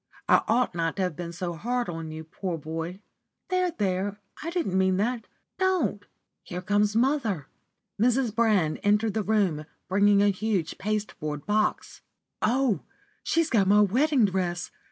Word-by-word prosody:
I - - +6
ought 235 +1 +2
not 165 -1 -1
to 195 - 0
have 180 -4 -2
been 170 +1 -5
so 175 0 -4
hard 240 +7 -2
on 165 -2 -5
you, 155 0 -7
poor 170 +2 -4
boy. 165 +5 -5 0.5
There! 365 -1 +2
there! 200 - -1 0.2
I 325 - -3
didn't 335 - -1
mean 190 0 +3
that. 230 +2 -1 0.3
Don't! 370 - 0 0.3
Here 180 +1 -6
comes 205 +2 +2
mother." 230 - +1 0.6
Mrs. 245 -1 +2
Brand 215 -9 +2
entered 210 +1 +2
the 220 - 0
room, 195 -7 +1 0.2
bringing 200 +1 +4
a 205 - +5
huge 195 -4 -2
pasteboard 195 -8 -3
box. 215 +1 0 0.4
"Oh, 245 - +2 0.4
she's 330 -1 +1
got 205 -6 +3
my 205 +2 +6
wedding 255 +5 +3
dress! 180 -2 -2
205 Hz, 155 wpm, -27 LUFS, 180-230 Hz, 0.6 s, I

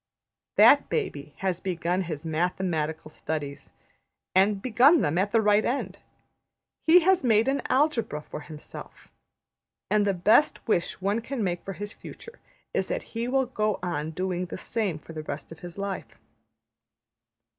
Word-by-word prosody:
That - - +6
baby 150 - -3
has 185 -2 0
begun 180 0 -1
his 155 -1 -6
mathematical 160 -2 -1
studies; 150 -3 -5 0.6
and 195 +2 +4
begun 255 - +5
them 160 +4 +1
at 200 +2 0
the 225 - +4
right 210 +1 +4
end. 220 -7 -2 0.9
He 350 +3 +8
has 375 0 +3
made 225 -1 +3
an 275 0 +1
Algebra 255 - +1
for - - -7
himself. 150 0 -11 0.8
And 210 -1 +3
the 195 - +1
best 215 +13 +3
wish 180 -4 0
one 200 +4 0
can 250 -1 -3
make 175 -2 -2
for 195 - -5
his 205 +2 -7
future 465 +1 -12 0.3
is - - 0
that - - -2
he 230 +1 -2
will 265 +1 +2
go 215 -4 -1
on 155 -3 -2
doing 180 +2 -2
the - - -6
same 210 -8 -2
for 165 - -12
the 155 - -5
rest 150 0 -7
of 165 - -10
his 175 +1 -9
life. 195 - -5
195 Hz, 155 wpm, -27 LUFS, 165-230 Hz, 0.9 s, He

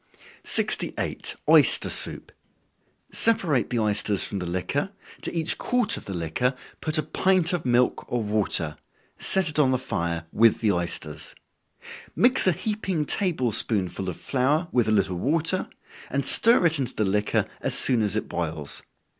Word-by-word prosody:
68. - - -1
Oyster - - +5
Soup. - - 0 0.8
Separate 175 - +2
the 125 - -2
oysters 105 -2 +1
from 100 - -4
the 90 - -5
liquor, 95 - -2 0.3
to - - -2
each 165 -1 +1
quart 245 -2 0
of - - -9
the 100 - -5
liquor, 85 - -1 0.3
put 155 0 0
a 155 - 0
pint 180 +3 +1
of 170 -7 -3
milk 125 +1 0
or 120 -2 -1
water, 100 -7 +2 0.4
set 190 -2 +2
it 155 0 0
on 140 -3 +4
the 130 - +1
fire 85 -9 -4
with 115 0 +4
the 110 -3 +1
oysters. 85 -4 -4 0.8
Mix 245 -4 +3
a - - +5
heaping 190 -3 -3
table 155 - 0
spoonful 95 -4 +1
of 90 - -7
flour 145 +6 -1
with 120 -3 +1
a - - +1
little 95 -4 0
water, 165 - 0 0.4
and 140 -1 -1
stir 230 - +4
it 160 -3 +3
into 130 -4 -3
the 110 - 0
liquor 105 +2 0 0.2
as - - 0
soon 125 -3 +2
as 105 -3 -1
it - - -3
boils. 80 -4 -5
125 Hz, 165 wpm, -24 LUFS, 100-165 Hz, 0.8 s, Oyster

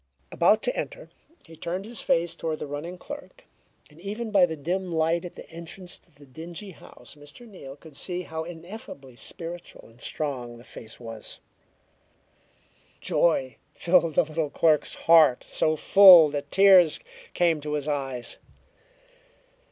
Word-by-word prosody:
About - - +3
to - - 0
enter, - - -6 0.3
he 165 - -14
turned 175 +5 -5
his 230 +1 -4
face 170 0 +1
toward 160 -1 -3
the - - -6
running 150 +5 -6
clerk, 290 - -10 0.4
and 155 +2 -19
even 215 +4 -5
by 190 -4 +5
the 160 - -5
dim 180 +5 -3
light 165 +1 +1
at 175 - -9
the - - -11
entrance 170 +2 -8
to - - -31
the 145 0 -19
dingy 165 +8 -9
house, 140 -6 -14
Mr. 145 +11 -14
Neal 140 -10 -11
could 150 0 -16
see 180 +4 -2
how 160 -1 -5
ineffably 165 - -10
spiritual 170 +6 -8
and 115 +2 -19
strong 125 -6 -4
the 120 - -15
face 110 -2 -11
was. 115 -3 -9 1.6
Joy 130 -8 +1 0.2
filled 170 -3 +2
the - - +5
little 155 -1 -3
clerk's 155 0 +2
heart 160 -6 +4
so 155 - +1
full 180 -2 +8
that 145 0 -5
tears 190 -4 +6 0.4
came 165 -3 +2
to 150 0 -4
his 150 -1 -3
eyes. 135 -4 -4
165 Hz, 150 wpm, -26 LUFS, 145-180 Hz, 1.6 s, full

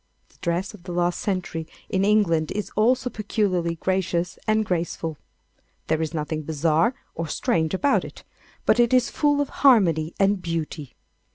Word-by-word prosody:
The - - -26
dress 175 +4 -1
of 210 - -13
the 180 +1 -8
last 175 0 0
century 180 -5 -3 0.2
in 190 0 0
England 195 -7 +2
is 210 0 -4
also 245 +4 +3
peculiarly 195 -6 -1
gracious 180 0 -1
and 215 0 +2
graceful. 165 -4 -2 0.7
There 160 0 +1
is 160 - -2
nothing 155 -1 -3
bizarre 160 - +1 0.2
or 165 0 -4
strange 160 +3 0
about 280 +9 +2
it, - - -10 0.4
but 230 - +4
it 240 +1 +4
is 250 - +2
full 290 -1 +2
of 285 - -2
harmony 175 - +4
and 195 -1 +3
beauty. 160 -4 -4
180 Hz, 160 wpm, -24 LUFS, 165-210 Hz, 0.7 s, but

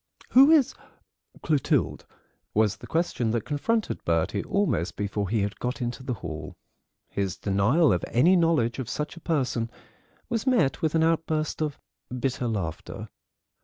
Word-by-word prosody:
"Who 270 +3 +7
is 295 -5 +5 0.7
Clotilde?" 150 -4 +1 0.5
was 105 -1 +2
the - - -11
question 160 -8 0
that 115 -1 -1
confronted 215 +10 -1
Bertie 85 +4 0
almost 200 - 0
before 100 -1 -2
he 110 0 +1
had 100 0 -3
got 125 +3 -3
into 120 +1 -3
the 130 -1 -3
hall. 80 -5 -7 0.5
His 100 -2 -2
denial 105 - +3
of 90 - -1
any 165 +11 +4
knowledge 160 -9 +2
of 130 -2 -4
such 150 +4 -3
a - - -10
person 130 -8 0 0.6
was 230 +1 -2
met 210 - +2
with 160 0 0
an 160 - +4
outburst 160 -1 0
of 150 -2 -1 0.4
bitter 130 -1 -1
laughter. 95 -8 -4
130 Hz, 150 wpm, -26 LUFS, 105-165 Hz, 0.7 s, Who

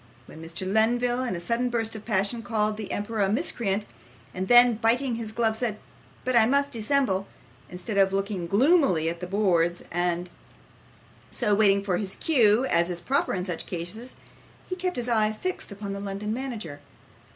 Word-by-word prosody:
When 160 - -12
Mr. 165 +3 -4
Lenville 240 +5 +1
in 240 -7 -2
a - - -4
sudden 235 +8 -1
burst 225 -2 0
of 215 - -8
passion 215 +2 0
called 215 -2 0
the 215 -2 -6
emperor 215 +2 -3
a 195 - +2
miscreant, 215 - 0 0.5
and 185 +1 -3
then 240 +1 +7
biting 240 +3 +1
his 225 -2 -4
glove, 220 -1 +1
said, 220 -2 -2 0.5
'But 255 -1 0
I 225 -2 +6
must 280 +2 +1
dissemble,' 225 -5 0 0.4
instead 180 +3 -3
of 195 0 +4
looking 195 -2 -2
gloomily 225 - +3
at 170 0 -5
the 180 - -5
boards 175 -3 +1
and 175 0 -1 1.0
so 210 - 0
waiting 200 -1 +4
for 185 -3 0
his 190 -1 -4
cue, 240 -5 +3
as 170 -7 +2
is 175 -1 -1
proper 265 +8 0
in 180 -1 -3
such 175 -4 -4
cases, 195 +9 -6 0.5
he 370 - -3
kept 365 0 -2
his 245 0 -2
eye 215 -2 +2
fixed 370 - -5
upon 200 0 -6
the 200 - -5
London 200 +2 -4
manager. 225 - -5
215 Hz, 180 wpm, -26 LUFS, 190-240 Hz, 1.0 s, then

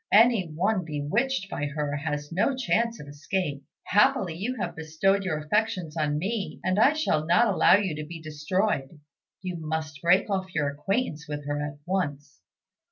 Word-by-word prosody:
Any 225 -4 +5
one 185 +5 0
bewitched 195 - -1
by 145 -5 -3
her 145 0 -2
has 145 0 -3
no 200 +10 +1
chance 235 -2 0
of 145 - -9
escape. 145 0 -3 0.2
Happily, 205 -4 +3
you 220 +9 -3
have 220 - -4
bestowed 165 +5 +1
your 170 -5 -1
affections 180 0 -1
on 150 -2 0
me, 200 +5 -3
and 185 +2 +1
I 270 +7 +6
shall 305 - +1
not 175 +8 +5
allow - - +6
you 195 -4 0
to 155 - -4
be 165 0 -7
destroyed. 155 0 -1 0.4
You 180 -2 -3
must 155 -2 -4
break 180 +3 +4
off 190 -2 -3
your 145 -3 +1
acquaintance 155 - -2
with 145 -1 -5
her 145 0 -2
at 145 -1 -5
once." 145 -6 -3
170 Hz, 170 wpm, -27 LUFS, 150-200 Hz, 0.4 s, I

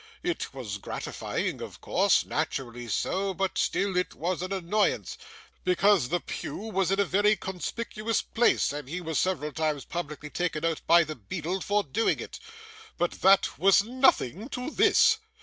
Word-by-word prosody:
It 350 -1 -2
was 110 -7 -6
gratifying, - - -4
of - - -8
course, - - +2
naturally 120 -2 -3
so, 190 - -1
but 190 +1 -1
still 195 -2 0
it 180 0 -1
was 175 +2 -2
an 185 +1 -4
annoyance, 195 +2 0 0.5
because 180 -5 +3
the 175 +2 +1
pew - - -6
was 195 -4 -1
in 195 +1 +1
a 200 - +4
very 205 +3 +3
conspicuous 215 +4 -3
place, 235 -10 +2
and 145 -2 -6
he 175 +4 -3
was 160 -4 -2
several 170 -5 -1
times 155 -1 -2
publicly 150 -3 -6
taken 165 -3 -2
out 165 -2 -1
by 170 +1 +7
the 155 0 -5
beadle 170 - -4
for 205 +2 +1
doing 150 +10 0
it. - - -8 0.6
But 175 - -2
that 195 -5 +4
was 195 +3 +5
nothing 235 - +2
to 250 +3 -4
this. 450 +3 +4
185 Hz, 165 wpm, -28 LUFS, 155-205 Hz, 0.6 s, by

